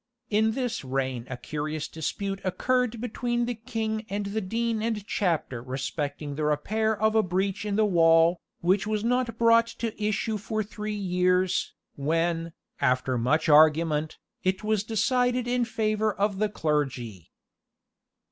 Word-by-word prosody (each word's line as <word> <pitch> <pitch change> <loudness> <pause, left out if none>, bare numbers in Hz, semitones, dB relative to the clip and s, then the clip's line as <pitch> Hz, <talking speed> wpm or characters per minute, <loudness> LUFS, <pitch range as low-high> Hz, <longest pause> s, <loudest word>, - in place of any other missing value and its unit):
In 220 +1 +3
this 245 - -2
reign 130 -2 -2
a 125 - -4
curious 150 +4 -4
dispute 195 +5 -4
occurred 240 +5 0
between 240 +1 -1
the 245 - -2
king 220 -1 -3
and 200 +1 -2
the 205 +2 -2
dean 225 +3 -1
and 220 -2 -2
chapter 165 - -1
respecting 140 +3 -4
the 155 +2 -3
repair 215 +9 0
of 220 +1 +3
a 220 - +5
breach 190 +2 -1
in 205 -1 -1
the 215 0 +3
wall, 165 -2 +4 0.2
which 190 +4 +2
was 215 -1 -1
not 240 -1 0
brought 230 0 +5
to 225 -3 -5
issue 215 +1 0
for 215 +1 -2
three 210 0 -5
years, 180 -1 +1 0.2
when, 165 +3 0 0.3
after 130 -1 +1
much 125 +8 +1
argument, 155 0 +4 0.3
it 185 +2 0
was 215 -2 +1
decided 245 +3 +1
in 245 0 +1
favour 215 -1 0
of 200 -1 -1
the 215 0 +1
clergy. 135 - -2
200 Hz, 145 wpm, -27 LUFS, 155-220 Hz, 0.3 s, a